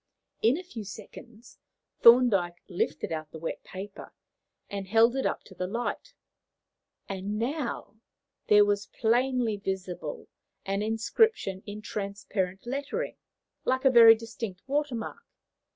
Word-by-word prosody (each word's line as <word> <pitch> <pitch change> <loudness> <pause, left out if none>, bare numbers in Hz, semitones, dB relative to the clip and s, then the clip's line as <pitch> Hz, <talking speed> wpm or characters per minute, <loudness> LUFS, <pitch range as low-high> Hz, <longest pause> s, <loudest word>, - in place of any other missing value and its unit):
In 235 +6 +4
a 365 - -6
few 240 -12 -8
seconds 220 +3 -12 0.4
Thorndyke 215 -8 +5
lifted 175 -3 -2
out 155 -1 -4
the 160 - -9
wet 165 +1 -5
paper, 195 +2 -9 0.5
and 200 -1 -5
held 230 +4 +4
it 270 - +1
up - - -3
to 190 - -14
the 180 0 -3
light, 245 - -4 0.9
and 195 +2 -4
now 245 -2 -3 0.5
there 210 0 +7
was 205 0 0
plainly 240 -1 +1
visible 190 -2 -5 0.4
an 195 +1 -1
inscription 225 - +1
in 210 +1 -7
transparent 200 -2 -3
lettering, 280 - -3 0.5
like 260 +1 0
a 265 - +7
very 230 -2 +9
distinct 225 -4 -7
water 285 -1 -1
mark. 230 - -6
220 Hz, 130 wpm, -28 LUFS, 195-245 Hz, 0.9 s, very